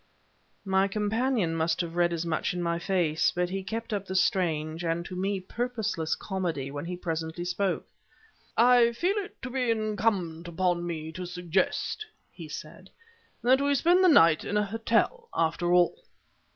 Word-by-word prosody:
My 190 0 +3
companion 215 -1 0
must 160 0 0
have 170 -1 -5
read 175 0 +3
as 170 0 -2
much 165 +3 -1
in 175 - -2
my 170 0 0
face. 175 -4 +1
But 180 0 0
he 195 0 -2
kept 225 +3 -5
up 200 -1 -3
the 190 - -4
strange, 165 -5 +1
and 170 +1 -1
to 185 - -7
me, 195 +2 -1
purposeless 215 -5 -2
comedy, 170 -9 -3
when 170 +5 -5
presently 165 -1 -4
he - - -3
spoke. 185 +2 -1 0.7
"I 240 0 +6
feel 355 - 0
it 405 - -5
to 255 - -5
be 250 -2 0
incumbent 210 -6 0
upon 175 0 0
me 160 -2 -4
to 180 +2 -6
suggest," 180 - -1 0.3
he - - -10
said, - - -9 0.5
"that 260 +3 +4
we 285 0 +2
spend 350 +7 +4
the - - +7
night 165 - +6
at 205 - -3
a 210 - +3
hotel 230 - 0
after 165 +2 +1
all." 180 - +3
185 Hz, 170 wpm, -28 LUFS, 170-225 Hz, 0.7 s, the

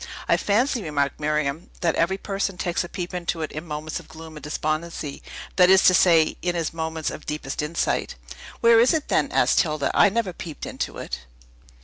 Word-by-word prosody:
"I - - +4
fancy," 235 +4 +1
remarked 145 -5 -1
Miriam, 150 +1 -1
"that 170 -2 +2
every 190 +3 +1
person 195 -1 -3
takes 175 -1 -1
a 175 - -8
peep 180 0 -5
into 170 -2 -2
it 155 - -4
in 155 +3 -7
moments 150 +1 -4
of - - -15
gloom 160 0 -11
and 150 - -10
despondency; 155 0 -3 0.4
that 180 -1 +6
is 190 0 +6
to 185 - +7
say, 165 -3 +4
in 175 0 -1
his 165 -2 -2
moments 160 -1 -3
of - - -9
deepest 150 -2 -3
insight." 150 +3 -1 0.5
"Where 230 -1 +6
is 245 +7 +5
it, 310 - -3
then?" - - +1
asked - - +4
Hilda. 155 -4 -1
"I 205 - +6
never 205 -3 -1
peeped 160 -2 -7
into - - -4
it." 60 - -6
165 Hz, 200 wpm, -24 LUFS, 155-185 Hz, 0.5 s, to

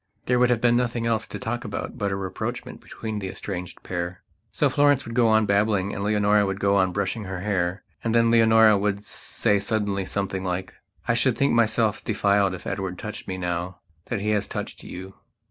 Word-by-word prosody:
There 125 0 +2
would 125 0 +4
have 120 -2 +2
been 120 -1 +4
nothing 120 -1 0
else 110 -2 0
to - - -6
talk 120 +2 -3
about - - -5
but 100 -5 -1
a - - 0
rapprochement 110 +6 -5
between 110 -2 -5
that 95 - -4
estranged 90 -2 -6
pair. 90 0 -4 0.3
So 145 - +2
Florence 145 0 +3
would 115 - -7
go 120 -1 +4
on 110 0 +4
babbling 100 -1 +1
and 100 - -4
Leonora 105 0 +3
would 95 0 -2
go 100 0 +2
on 95 -2 +3
brushing 100 +3 -2
her 95 -1 -5
hair. 95 -2 -1 0.2
And 115 0 0
then 115 0 +4
Leonora 110 -2 +6
would 100 0 -1
say 105 -1 -1
suddenly 100 -1 -1
something 95 -1 -2
like: 95 0 -3 0.3
"I 115 - +3
should 120 +1 +2
think 140 - +2
myself 110 -2 +2
defiled 100 -3 +2
if 90 - -11
Edward 95 -2 -3
touched 105 +3 -7
me 95 - -3
now 90 0 -3 0.3
that 115 -4 -3
he 105 +1 0
has 105 -2 0
touched - - -6
you." 95 +2 -8
105 Hz, 205 wpm, -25 LUFS, 95-115 Hz, 0.3 s, Leonora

